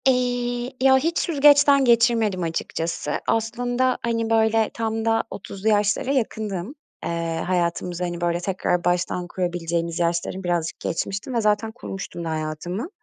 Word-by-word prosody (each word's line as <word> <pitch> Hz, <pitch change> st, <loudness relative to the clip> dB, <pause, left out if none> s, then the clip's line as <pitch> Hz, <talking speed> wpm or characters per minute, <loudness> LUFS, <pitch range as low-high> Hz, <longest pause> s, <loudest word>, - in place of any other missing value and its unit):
Eee, 245 Hz, -1 st, 0 dB
ya, 265 Hz, 0 st, +6 dB
hiç 330 Hz, +6 st, 0 dB
süzgeçten 285 Hz, -3 st, +5 dB
geçirmedim 230 Hz, -5 st, +3 dB
açıkçası. 165 Hz, -1 st, -3 dB, 0.2 s
Aslında 245 Hz, +3 st, 0 dB
hani, 230 Hz, -1 st, 0 dB
böyle, 220 Hz, -1 st, +3 dB
tam 225 Hz, -1 st, -2 dB
da 225 Hz, 0 st, +2 dB
30'lu 200 Hz, +2 st, -4 dB
yaşlara 210 Hz, +4 st, +2 dB
yakındım. 220 Hz, -, -2 dB, 0.3 s
Eee, 165 Hz, -1 st, -2 dB
hayatımızı, 175 Hz, 0 st, -1 dB
hani, 175 Hz, -1 st, -3 dB
böyle, 175 Hz, 0 st, +1 dB
tekrar 180 Hz, -1 st, -1 dB
baştan 175 Hz, 0 st, 0 dB
kurabileceğimiz 170 Hz, -2 st, -2 dB
yaşları 170 Hz, +2 st, -1 dB
birazcık 175 Hz, -2 st, -1 dB
geçmiştim 195 Hz, +8 st, -3 dB
ve 235 Hz, -, +1 dB
zaten 210 Hz, +1 st, +1 dB
kurmuştum 195 Hz, -7 st, -7 dB
da 165 Hz, -, -3 dB
hayatımı. 160 Hz, -, -3 dB
210 Hz, 135 wpm, -23 LUFS, 175-240 Hz, 0.3 s, ya